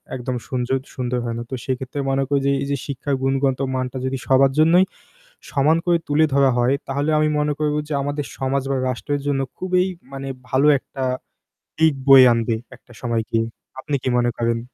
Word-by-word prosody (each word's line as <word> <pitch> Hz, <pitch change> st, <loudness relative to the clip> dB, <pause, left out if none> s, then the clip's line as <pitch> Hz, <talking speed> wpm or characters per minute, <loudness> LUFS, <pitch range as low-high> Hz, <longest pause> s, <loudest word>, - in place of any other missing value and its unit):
একদম 125 Hz, 0 st, -3 dB
সুনজদ 130 Hz, +1 st, -1 dB
সুন্দর 125 Hz, -1 st, -2 dB
হয় 115 Hz, -1 st, -3 dB
না। 120 Hz, -, -4 dB
তো -, -, -8 dB
সেক্ষেত্রে 130 Hz, +1 st, -3 dB
মনে 135 Hz, 0 st, +1 dB
করি 140 Hz, 0 st, +2 dB
যে -, -, +3 dB
এই -, -, -4 dB
যে 140 Hz, -, 0 dB
শিক্ষার 140 Hz, 0 st, -2 dB
গুণগত 135 Hz, 0 st, +1 dB, 0.2 s
মানটা 130 Hz, 0 st, -3 dB
যদি 130 Hz, 0 st, -1 dB
সবার 135 Hz, 0 st, +5 dB
জন্যই 170 Hz, +4 st, +6 dB, 0.7 s
সমান 150 Hz, +3 st, +3 dB
করে 175 Hz, -1 st, +3 dB
তুলে 150 Hz, +2 st, +3 dB
ধরা 140 Hz, -1 st, +5 dB
হয় 125 Hz, +3 st, +3 dB
তাহলে 140 Hz, +3 st, 0 dB
আমি 155 Hz, 0 st, +3 dB
মনে 150 Hz, 0 st, +1 dB
করবো 150 Hz, 0 st, 0 dB
যে -, -, -5 dB
আমাদের 145 Hz, +1 st, -2 dB
সমাজ 135 Hz, 0 st, 0 dB
বা 135 Hz, -, +1 dB
রাষ্ট্রের 145 Hz, +3 st, -3 dB
জন্য 140 Hz, -1 st, +1 dB, 0.2 s
খুবই 185 Hz, 0 st, +1 dB, 0.3 s
মানে 135 Hz, 0 st, -5 dB, 0.2 s
ভালো 135 Hz, +2 st, +2 dB
একটা 135 Hz, 0 st, -8 dB, 0.8 s
দিক 160 Hz, -2 st, +4 dB
বয়ে 135 Hz, -1 st, +9 dB
আনবে 115 Hz, -1 st, 0 dB, 0.2 s
একটা -, -, -22 dB
সময় 115 Hz, -2 st, -1 dB
গিয়ে। 115 Hz, 0 st, +1 dB, 0.3 s
আপনি 145 Hz, +1 st, -2 dB
কি 130 Hz, -, 0 dB
মনে 120 Hz, 0 st, +1 dB
করেন? 115 Hz, 0 st, +1 dB
135 Hz, 190 wpm, -21 LUFS, 130-145 Hz, 0.8 s, বয়ে